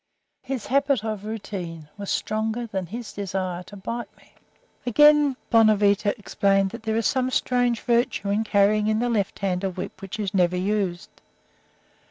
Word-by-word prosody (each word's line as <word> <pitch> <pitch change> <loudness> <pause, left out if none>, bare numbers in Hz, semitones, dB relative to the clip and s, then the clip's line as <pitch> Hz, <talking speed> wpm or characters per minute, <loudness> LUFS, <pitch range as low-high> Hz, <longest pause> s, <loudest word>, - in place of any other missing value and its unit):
His 265 -5 -4
habit 275 -2 +2
of 215 -2 -4
routine 185 -7 -6
was 205 -1 -7
stronger 220 +2 -1
than 190 -5 -4
his 230 +5 -7
desire 185 -3 -3
to 190 +3 -12
bite 230 +5 -4
me." - - -24 0.5
Again, 295 +2 +5
Bonavita 210 -2 +4
explained 195 -2 +1
that 230 - -8
there 220 0 -2
is 225 - 0
some 255 -1 +1
strange 245 -2 +1
virtue 235 -4 +1
in 210 +2 +1
carrying 210 0 +3
in 215 0 +2
the 240 +2 0
left 205 -4 -1
hand 185 -1 -1
a 195 - +1
whip 185 0 -7
which 195 +2 -7
is 200 -3 -2
never 180 -1 +2
used. 190 -1 -1
210 Hz, 165 wpm, -24 LUFS, 195-235 Hz, 0.5 s, Again